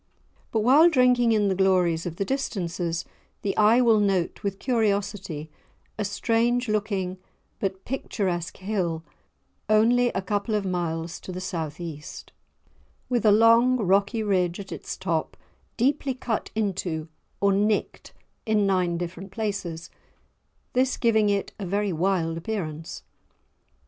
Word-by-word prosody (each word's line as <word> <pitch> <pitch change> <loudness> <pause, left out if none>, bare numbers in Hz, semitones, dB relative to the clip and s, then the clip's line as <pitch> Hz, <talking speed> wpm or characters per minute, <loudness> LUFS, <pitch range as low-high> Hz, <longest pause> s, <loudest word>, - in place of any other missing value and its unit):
But 220 - +1
while 285 +9 +6
drinking 250 -5 +4
in 210 -2 +3
the 195 - +2
glories 180 -3 +2
of 170 - -5
the 195 - -2
distances, 175 -9 -2 0.4
the 195 - -1
eye 220 +4 +5
will 230 -3 +5
note 195 -4 0
with 200 -1 -2
curiosity 200 - -1 0.4
a 215 - -2
strange 235 +4 +1
looking 200 -3 -1 0.4
but 190 -1 -3
picturesque 185 -9 -3
hill 185 -5 -2 0.7
only 235 +3 +4
a 190 - -1
couple 205 +2 -1
of 205 -2 -1
miles 170 -2 -2
to - - -8
the 180 - -5
South 165 -5 -4
east, 160 -4 -8 0.8
with 240 -3 +2
a - - +7
long 230 +4 +5
rocky 200 +2 +2
ridge 180 -4 +1
at 195 -1 -8
its - - -6
top 170 -4 -2 0.4
deeply 265 +1 +1
cut 240 -4 -3
into 185 -7 -2 0.3
or 200 0 +3
"nicked" 210 +2 0 0.3
in 215 -2 +2
nine 180 -3 +1
different 175 +2 -6
places, 195 -6 -4 0.8
this 255 +1 +2
giving 220 -3 +3
it 200 -1 -1
a 200 - -4
very 200 +1 0
wild 165 -1 0
appearance. 165 -5 -5
200 Hz, 135 wpm, -25 LUFS, 175-220 Hz, 0.8 s, a